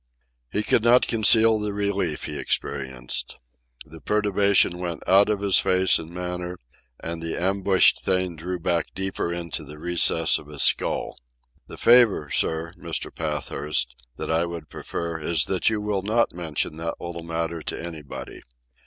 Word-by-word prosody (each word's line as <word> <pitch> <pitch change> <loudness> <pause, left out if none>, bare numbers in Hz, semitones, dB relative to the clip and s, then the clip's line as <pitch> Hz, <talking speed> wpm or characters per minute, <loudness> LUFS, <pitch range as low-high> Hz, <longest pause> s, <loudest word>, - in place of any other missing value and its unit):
He 105 - -1
could 110 - +2
not 120 +2 +5
conceal 110 0 +5
the 105 -1 -2
relief 100 0 -2
he - - -4
experienced. 65 -3 -3 0.5
The 80 +1 -13
perturbation 100 -3 +2
went 85 -2 -5
out 100 +2 +5
of 105 -2 -1
his 100 -2 +4
face 95 -1 +3
and 80 - -8
manner, 90 0 -5 0.4
and 85 0 -5
the 80 0 -3
ambushed 95 +1 +3
thing 90 -2 0
drew 90 +3 -5
back 85 -1 0
deeper 95 -2 -1
into 85 -2 -4
the 75 +1 -10
recess 80 -1 +2
of 75 - -14
his 75 -2 -2
skull. - - 0 0.5
"The - - -10
favour, 115 -11 +4
sir, 80 +1 0
Mr. - - -4
Pathurst, 75 -4 -2 0.2
that - - -4
I 80 +1 +2
would 85 -3 -7
prefer 85 -1 -5
is 80 -1 +1
that 95 +2 +1
you 110 -1 -1
will 105 -2 -2
not 110 +4 +1
mention 80 -2 -3
that 85 0 -4
little 85 -1 -7
matter 85 0 -3
to - - -5
anybody. 80 -5 -8
85 Hz, 160 wpm, -24 LUFS, 80-100 Hz, 0.5 s, not